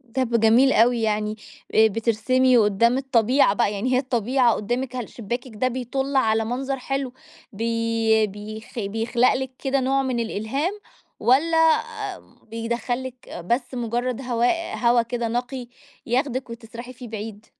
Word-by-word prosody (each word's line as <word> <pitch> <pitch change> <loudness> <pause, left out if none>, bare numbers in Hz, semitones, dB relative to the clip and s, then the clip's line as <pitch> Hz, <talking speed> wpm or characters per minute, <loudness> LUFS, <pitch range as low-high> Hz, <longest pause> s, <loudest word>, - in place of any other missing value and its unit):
طب 240 -3 +1
جميل 235 +5 +5
أوي 235 +1 +4
يعني، 215 -1 0 0.4
آآ 220 0 +7
بترسمي 235 +4 +2
قدّام 230 +3 +3
الطبيعة 255 -2 +3
بقى، 210 -2 +1
يعني 245 +6 -1
هي 250 - +4
الطبيعة 250 -1 +2
قدّامِك، 245 +5 -3
هل 245 -3 -4
شباكِك 240 +3 -5
ده 255 +5 +1
بيطُل 260 +2 -3
على 225 -4 +2
منظر 265 +3 -3
حلو، 270 0 -3 0.4
بي 230 0 +1
بيخ 215 +4 -8
بيخلق 225 +4 +1
لِك 265 0 -3
كده 275 0 0
نوع 270 +1 +1
من 255 -2 -1
الإلهام، 270 - -2 0.4
والّا 300 +7 +3 0.9
بيدخّل 235 +2 -2
لِك 255 -1 -10
بس 240 +9 -2
مجرد 245 +1 -2
هواء 245 +7 0
هوا 240 0 +4
كده 235 0 -3
نقي 245 +2 -3 0.4
ياخدِك، 255 0 -1
وتسرحي 235 +1 -9
فيه 250 0 -10
بعيد؟ 215 -1 -7
240 Hz, 140 wpm, -23 LUFS, 225-255 Hz, 0.9 s, آآ